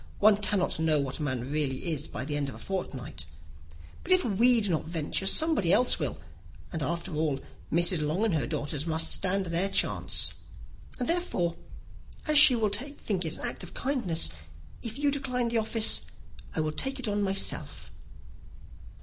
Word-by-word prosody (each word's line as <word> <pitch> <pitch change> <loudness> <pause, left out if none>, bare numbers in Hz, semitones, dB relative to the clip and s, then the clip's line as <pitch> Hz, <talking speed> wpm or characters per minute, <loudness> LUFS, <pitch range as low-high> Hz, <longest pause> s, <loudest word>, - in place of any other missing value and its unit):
One 210 0 +5
cannot 200 -4 -1
know 160 -2 +2
what 140 +1 -3
a - - -5
man 130 -2 -3
really 150 +1 -2
is 150 0 -3
by 130 - -5
the 145 0 -3
end 145 -1 -1
of 125 - -9
a - - -10
fortnight. 125 - -5 0.8
But 370 - -7
if 370 -1 +5
we 235 +3 +4
do 205 -4 0
not 160 - -1
venture, 165 +3 -2
somebody 305 - +3
else 250 +6 +4
will; - - -3 0.6
and 160 - -3
after 170 +5 -3
all, 150 -3 0 0.3
Mrs. 170 0 +3
Long 155 +8 0
and 215 - +1
her 145 -7 0
nieces 145 +2 -3
must 160 0 0
stand 195 0 +1
their 175 +3 0
chance; - - 0 0.6
and, 245 - -3
therefore, 260 - 0 0.7
as 305 -1 +6
she 280 -4 +10
will 220 -3 +1
think 210 - -2
it 160 - -3
an - - -5
act - - -6
of 180 - -9
kindness, 230 - -1 0.5
if 230 +1 -5
you 285 0 +1
decline 250 -4 -1
the 230 -1 +1
office, 220 0 +2 0.5
I 160 - +1
will 155 0 -1
take 270 - -1
it 255 - -2
on 205 0 0
myself." 195 -1 0
180 Hz, 180 wpm, -28 LUFS, 155-230 Hz, 0.8 s, she